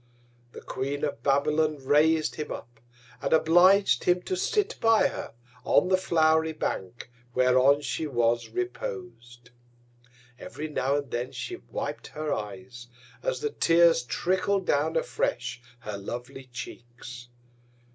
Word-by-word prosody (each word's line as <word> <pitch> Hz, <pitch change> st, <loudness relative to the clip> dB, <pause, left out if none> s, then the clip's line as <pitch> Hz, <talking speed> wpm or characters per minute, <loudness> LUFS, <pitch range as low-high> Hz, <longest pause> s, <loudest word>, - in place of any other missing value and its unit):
The -, -, -9 dB
Queen 140 Hz, +2 st, -4 dB
of 140 Hz, -5 st, -2 dB
Babylon 150 Hz, +3 st, +2 dB
rais'd 150 Hz, +3 st, +3 dB
him 150 Hz, -1 st, -5 dB
up, 120 Hz, -1 st, -8 dB, 0.4 s
and -, -, 0 dB
oblig'd 180 Hz, +5 st, +5 dB
him 180 Hz, 0 st, +2 dB
to 375 Hz, -, -2 dB
sit 415 Hz, +4 st, 0 dB
by 225 Hz, -1 st, +4 dB
her -, -, -7 dB, 0.3 s
on 180 Hz, -, +3 dB
the 190 Hz, -, +5 dB
flow'ry 160 Hz, -3 st, +2 dB
Bank 115 Hz, -1 st, -4 dB, 0.2 s
whereon 130 Hz, +3 st, +4 dB
she 155 Hz, +1 st, -3 dB
was 120 Hz, -3 st, +1 dB
repos'd. 360 Hz, -, -6 dB, 0.9 s
Every 155 Hz, -, -6 dB
now 140 Hz, -2 st, 0 dB
and 140 Hz, -3 st, -3 dB
then 120 Hz, +2 st, -3 dB
she 360 Hz, -, -6 dB
wip'd -, -, -6 dB
her 155 Hz, -1 st, -1 dB
Eyes, 120 Hz, +3 st, -7 dB, 0.3 s
as -, -, -2 dB
the 440 Hz, -1 st, -1 dB
Tears 165 Hz, -, +4 dB
trickl'd 190 Hz, +7 st, 0 dB
down 155 Hz, +3 st, +1 dB
afresh 140 Hz, -, -2 dB, 0.2 s
her 105 Hz, -1 st, -6 dB
lovely 120 Hz, +5 st, -7 dB
Cheeks. 120 Hz, 0 st, -9 dB
150 Hz, 130 wpm, -27 LUFS, 125-180 Hz, 0.9 s, oblig'd